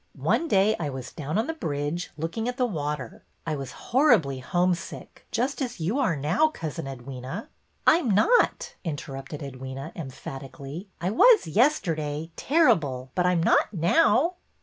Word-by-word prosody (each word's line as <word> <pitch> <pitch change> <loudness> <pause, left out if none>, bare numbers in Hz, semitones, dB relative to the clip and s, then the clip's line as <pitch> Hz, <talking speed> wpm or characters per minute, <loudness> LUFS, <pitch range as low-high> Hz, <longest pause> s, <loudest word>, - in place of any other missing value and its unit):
One 335 - +1
day 205 -2 +3
I 155 -4 -2
was 130 -2 -6
down 155 +3 -3
on 220 - +1
the 325 - -3
bridge, 150 - -3
looking 170 +9 -3
at 250 - -5
the 255 - +2
water. 150 - -4 0.2
I 155 -2 -1
was 135 -3 -6 0.2
horribly 220 - +4
homesick, 175 +6 -2
just 255 +5 -1
as 245 -6 -3
you 190 - 0
are 220 - +2
now. 155 - +2
Cousin 165 - -5
Edwyna." 135 - -7 0.2
'' - - -42
I 325 - +6
'm 265 - -2
not," 435 - +3
interrupted 140 -3 -6
Edwyna, 135 +1 -7
emphatically. 140 +3 -8
I 175 +3 -1
was 435 - +6
yesterday, 160 - +1
terrible, 160 - +2
but 180 -1 +2
I - - +4
'm 170 -2 +1
not - - +3
now." 330 - +3
165 Hz, 160 wpm, -26 LUFS, 140-230 Hz, 0.2 s, I